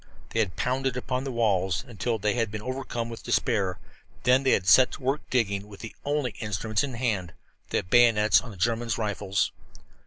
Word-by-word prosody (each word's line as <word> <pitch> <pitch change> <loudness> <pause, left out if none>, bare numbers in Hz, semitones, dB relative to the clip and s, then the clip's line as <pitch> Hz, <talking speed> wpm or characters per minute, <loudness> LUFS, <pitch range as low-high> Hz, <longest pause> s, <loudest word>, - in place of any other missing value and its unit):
They 115 - -2
had 100 -6 0
pounded 130 0 -1
upon 130 +1 -2
the 135 - -3
walls 95 -6 +1
until 115 0 -2
they 105 0 0
had 115 -3 0
been 105 0 -6
overcome 130 -2 -3
with 115 -1 -8
despair, 100 -7 +1
and - - -25
then 125 +1 +5
they 135 - +3
had 90 - +1
set 125 +5 +7
to - - -9
work 135 +3 0
digging 100 -5 0
with 100 -2 -12
the 115 - -8
only 145 -3 -1
instruments 105 +1 -1
at 135 -3 -4
hand 105 -8 -2 0.4
the - - 0
bayonets 105 -1 +5
on 120 - -10
the 100 - -10
German 115 +5 0
rifles. 100 -3 -1
115 Hz, 195 wpm, -27 LUFS, 100-125 Hz, 0.4 s, set